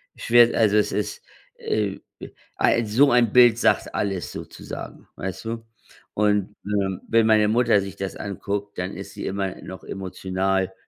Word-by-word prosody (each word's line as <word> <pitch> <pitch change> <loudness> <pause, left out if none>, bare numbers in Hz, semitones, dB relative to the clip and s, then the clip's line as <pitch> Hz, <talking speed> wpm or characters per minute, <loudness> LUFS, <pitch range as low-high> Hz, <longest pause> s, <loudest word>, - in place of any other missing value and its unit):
schwer, 120 0 +4
also, 105 -2 +4
es 105 - +2
ist, 105 0 -3 0.3
äh, 105 -2 -2 0.6
ei 115 - +3
so 135 +7 +4
ein 120 -3 +4
Bild 120 -3 +7
sagt - - +1
alles 95 -3 -2
sozusagen, - - -9
weißt 95 +3 -6
du? 115 0 -5 0.5
Und, 105 -1 +1
ähm, 100 -2 -1
wenn 115 -1 +3
meine 110 -1 +4
Mutter 115 -2 +3
sich 100 0 -7
das 95 0 -5
anguckt, 100 +1 -5
dann 90 0 -4
ist - - -8
sie - - -6
immer 95 -1 -2
noch 95 +1 -9
emotional. 95 0 -2
105 Hz, 155 wpm, -23 LUFS, 95-115 Hz, 0.6 s, Bild